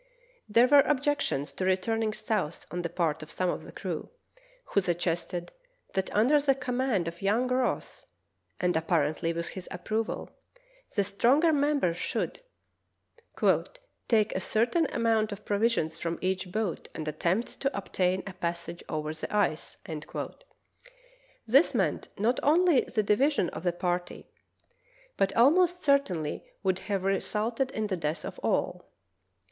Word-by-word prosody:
There 230 +4 +6
were 285 +2 +7
objections 285 - +1
to - - -3
returning 215 +4 +1
south 215 -6 -2
on 175 - -2
the 170 - -3
part 160 -3 -1
of 155 - -9
some 180 0 0
of - - -4
the - - -11
crew, - - -5 0.6
who 200 - +1
suggested 175 0 -2 0.4
that 190 -1 -1
under 250 +8 +5
the 275 -1 +3
com 255 -2 -3
mand 235 -10 +1
of 170 +1 -6
young 215 +6 +2
Ross 255 0 -1 0.5
(and 180 0 +1
apparently 160 0 +1
with 170 0 -3
his 185 -2 -8
approval) 215 +5 -3 0.6
the 200 - +3
stronger 255 - +3
members 285 - +2
should - - -2 1.7
"take 215 -3 +3
a - - +1
certain 240 - +2
amount 225 -3 +1
of 205 +1 -8
provisions 200 -7 +1
from 170 0 -2
each 185 0 -2
boat 215 -3 -2
and 155 -1 -5
attempt 175 +8 -1
to 275 -3 -1
obtain 185 -1 0
a 195 - -6
passage 170 -1 -4
over 155 -1 -2
the 155 - -6
ice." 205 -7 0 1.7
This 270 +9 +4
meant - - 0
not 230 +5 +1
only 320 -1 +4
the 215 -3 0
divi 210 +8 +3
sion 285 - 0
of 155 - -7
the 175 0 +1
party, 175 0 -3 0.8
but 195 - 0
almost 350 +8 +4
certainly 200 - +1 0.2
would 190 -1 +1
have 195 -2 0
re 195 0 +2
sulted 230 +5 -1
in 220 -5 -2
the 195 -3 -2
death 155 0 -2
of - - -7
all. - - -1
200 Hz, 150 wpm, -29 LUFS, 175-250 Hz, 1.7 s, were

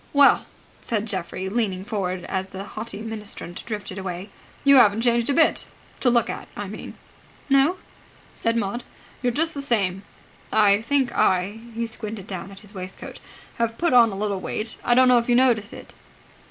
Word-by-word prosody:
"Well," 285 -1 +5 0.3
said 220 -3 -1
Geoffrey 190 -2 -4
leaning 195 -3 -1
forward, 185 -5 -2
as 190 0 -3
the 190 0 -7
haughty 210 0 -7
ministrant 210 -5 -7
drifted 205 -3 -5
away, 190 +1 -6 0.3
"you 280 -1 +7
haven't 215 -3 +6
changed 235 0 +2
a - - +3
bit. 320 - +3 0.3
To 250 - +3
look 235 -2 +3
at, - - -6
I 205 - -3
mean." 210 +3 -8 0.6
"No?" 275 +7 +4 0.6
said 230 0 0
Maud. 230 +3 -2 0.4
"You're 250 -1 +1
just 320 +6 +1
the 280 - -4
same. 195 -8 0 0.5
I 205 -1 +5
think 265 +1 +1
I" 190 +4 +2 0.2
he 235 0 -1
squinted 220 -3 -6
down 190 -1 -6
at 195 0 -11
his 205 0 -11
waistcoat 185 -1 -8 0.4
"have 230 0 0
put 340 -6 +1
on 235 -3 +7
a - - -5
little 200 -1 -1
weight. 215 +4 -3
I 240 - +3
don't 255 +1 +6
know 250 -1 +6
if 235 - -4
you 240 - +5
notice 235 -4 +3
it?" - - -11
220 Hz, 180 wpm, -24 LUFS, 195-240 Hz, 0.6 s, you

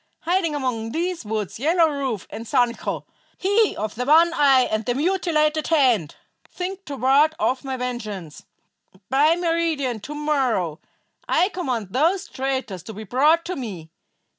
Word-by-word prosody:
Hiding 340 -3 0
among 240 -5 -2
these 345 0 -2
woods 215 -1 -4
Yellow 325 +4 +3
Rufe 270 -8 -3
and 225 +2 -7
Sancho, 245 -2 0 0.3
he 405 +3 +2
of 215 0 -3
the 245 - -3
one 330 +4 +5
eye 275 -4 +5
and 215 -3 -1
the 240 +2 -1
mutilated 310 -2 +1
hand, 250 - +2 0.3
think 380 +2 -6
to 280 -2 -6
ward 280 +5 +4
off 265 -6 0
my 265 -1 -4
vengeance. 215 -10 -5 0.7
By 295 +5 +4
meridian 330 -8 -1
to 290 +9 -8
morrow 255 - 0 0.5
I 365 - +3
command 255 - -3
those 350 - +1
traitors 260 -8 -3
to 220 +5 -9
be 215 +2 -8
brought 300 - +3
to 365 - -3
me. 185 -11 -7
275 Hz, 150 wpm, -23 LUFS, 230-330 Hz, 0.7 s, one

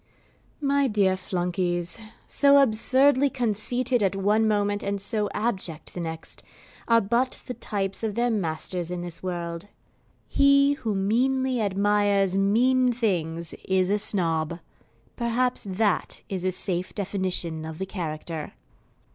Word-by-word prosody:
My 280 -1 +2
dear 200 -5 +2
Flunkeys, 175 -1 -2 0.3
so 280 0 +4
absurdly 265 +3 +4
conceited 245 +1 0
at 195 -1 +1
one 210 +3 +2
moment 205 -1 +1
and 200 0 -2
so 210 +1 -1
abject 190 -8 -3
at - - -24
the - - -6
next, 160 -1 -6 0.5
are 230 -1 +5
but 235 +5 0
the 250 - -5
types 195 -4 -3
of 220 -3 -2
their 240 0 +1
masters 175 -2 -2
in 180 -1 -4
this 175 -2 -7
world. 170 -1 -4 0.6
HE 280 0 +4
WHO 225 -8 -3
MEANLY 250 +5 +1
ADMIRES 200 -1 +2
MEAN 245 +6 +3
THINGS 170 -8 -1
IS 190 0 +1
A 210 - +2
SNOB 170 -5 0 0.6
perhaps 245 +1 0
that 200 0 0
is 185 -2 -3
a 185 - +1
safe 185 0 -3
definition 185 -5 -2
of 160 0 -7
the 190 - -3
character. 160 -4 -5
200 Hz, 135 wpm, -25 LUFS, 180-235 Hz, 0.6 s, are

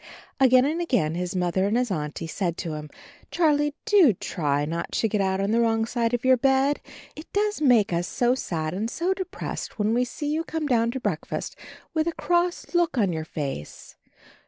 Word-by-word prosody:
Again 255 -1 +6
and 320 +4 -1
again 235 - +1
his 180 +1 -3
Mother 180 +1 +1
and 215 +3 +1
his 245 -3 0
Auntie 150 -2 -3
said 170 +1 -2
to 165 -3 -4
him: 150 0 -6 0.4
"Charlie, 295 -3 +2
do 395 - +6
try 145 -5 -1
not 165 +2 -4
to 225 - +1
get 210 -1 0
out 190 0 0
on 195 +1 0
the 230 - +3
wrong 225 -1 +2
side 230 0 -1
of 245 - -5
your 260 0 +6
bed. 270 +3 +2 0.3
It 310 - -11
does 415 -2 0
make 235 - +4
us 175 +1 0
so 245 0 +1
sad 160 -10 -3
and 210 +5 -2
so 350 +8 0
de 380 -1 -4
pressed 360 - -6
when 210 +1 +1
we 245 +1 +2
see 290 +4 -3
you 320 +1 0
come 320 -1 -3
down 235 -4 +2
to 265 +3 -3
breakfast 260 - -3 0.4
with 315 0 +1
a 335 - 0
cross 350 +1 0
look 345 -5 +2
on 200 -6 +2
your 160 -1 -3
face. 140 - -6
235 Hz, 205 wpm, -25 LUFS, 180-295 Hz, 0.4 s, Again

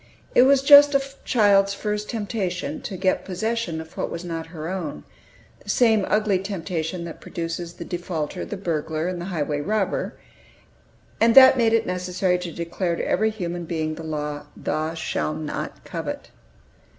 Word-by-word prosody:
It - - +6
was 275 -1 +4
just 285 0 +8
a 275 - +4 0.2
child's 200 -3 +4
first 210 0 -3
temptation 215 - -3
to 195 -6 -6
get 185 +1 +1
possession 195 -2 -2
of 160 0 -10
what - - -2
was 170 +1 -6
not 165 -2 -4
her 160 -1 -7
own, 170 - -4 0.6
the - - -13
same 220 -2 +3
ugly 210 -3 +2
temptation 180 -3 -3
that 170 -1 -8
produces 170 0 -5
the 170 - -8
defaulter, 175 -4 -4
the 205 - -5
burglar, 160 -3 -2
and 180 -1 -3
the - - -5
highway 150 -5 -2
robber, 210 +3 -1 1.0
and 230 0 +4
that 265 0 +10
made 230 -3 +3
it 230 0 +3
necessary 180 0 0
to 180 -1 -5
declare 170 +2 -2
to - - -3
every 220 +4 +2
human 175 -5 -4
being 155 -1 -2
the 160 - -8
law, 150 -2 -4
"Thou 155 +1 -2
shalt 155 -1 -2
not 155 -1 -5
covet." - - -6
180 Hz, 165 wpm, -24 LUFS, 165-210 Hz, 1.0 s, that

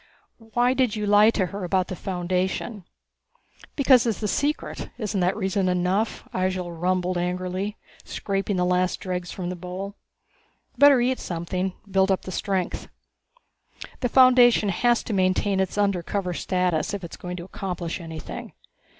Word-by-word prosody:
"Why 245 +1 +3
did 255 -4 +1
you 210 -1 -2
lie 205 +1 +6
to 205 -4 +1
her 195 +3 -6
about 185 +1 +1
the 185 - -5
Foundation?" 185 +3 -2 0.9
"Because 260 -4 +5
it's 225 -1 -2
a - - +1
secret 290 - -2
isn't 210 -3 -2
that 180 +2 +1
reason 190 -2 0
enough?" 180 +4 0
Ihjel 185 -1 -1
rumbled 180 +1 0
angrily, 185 +3 -2 0.3
scraping 195 0 -2
the 180 -1 +1
last 180 0 +1
dregs 180 -2 -4
from 180 -1 -4
the - - -4
bowl. 185 +3 -6 0.8
"Better 285 -2 +7
eat 255 +1 +1
something. 180 +2 -3
Build 195 0 +2
up 190 - +1
the 185 - -6
strength. 190 -1 -2 1.1
The 245 - 0
Foundation 245 -4 +6
has 240 +6 +2
to 220 - -4
maintain 190 +1 +1
its 190 +1 -1
undercover 195 -2 0
status 180 +1 0
if 195 - -7
it 170 - -8
is - - -8
going 180 0 -6
to 170 - -6
accomplish 180 -2 -4
anything. 160 -2 -7
190 Hz, 155 wpm, -25 LUFS, 180-210 Hz, 1.1 s, Better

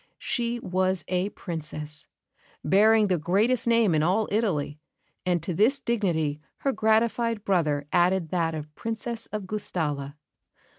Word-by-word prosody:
She 240 -1 -2
was 185 -3 0
a 185 +2 0
Princess, 155 -5 -7 0.6
bearing 215 +2 +5
the 185 -4 +1
greatest 210 +10 +1
name 230 -5 +4
in 155 - +3
all 190 +7 +2
Italy; 170 -9 0 0.5
and 175 -3 +1
to 180 - -2
this 230 - +3
dignity 170 - 0 0.2
her 275 - +1
gratified 225 0 +1
brother 155 -7 +1
added 175 -1 +3
that 165 -2 0
of 150 0 -7
Princess 225 +4 -4
of 210 -2 -5
Gustalla. 150 -9 -3
185 Hz, 135 wpm, -26 LUFS, 160-220 Hz, 0.6 s, bearing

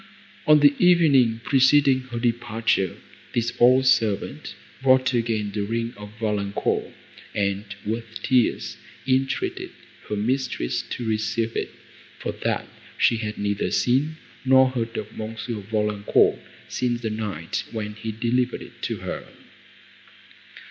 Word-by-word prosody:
On 150 -1 +7
the 145 -1 +7
evening, 140 -11 +5
preceding 135 0 +4
her 120 - -4
departure, 115 -5 0 0.4
this 120 0 0
old 130 +2 +6
servant 115 -6 +1 0.3
brought 130 0 +4
again 115 -3 0
the 105 - -2
ring 115 +3 -2
of 105 0 -9
Valancourt, 105 -2 -1 0.4
and, 100 0 0 0.2
with 115 +1 -4
tears, 125 -4 +1 0.3
entreated 350 - 0 0.4
her 105 - -1
mistress 125 - -1
to 120 - -6
receive 110 +1 -1
it, - - -2 0.5
for - - -3
that - - -2 0.3
she 115 - +3
had 110 -1 -4
neither 100 0 -1
seen, 145 +6 +1 0.3
nor 130 0 +5
heard 115 -2 -3
of 110 +1 -6
M. 110 +1 -5 0.3
Valancourt, 105 -2 +2 0.3
since 120 -1 -1
the 110 -2 -2
night 105 -7 -3
when 105 -2 -4
he 110 +1 -5
delivered 120 +3 0
it - - -15
to - - -2
her. - - -5
115 Hz, 130 wpm, -24 LUFS, 105-130 Hz, 0.5 s, On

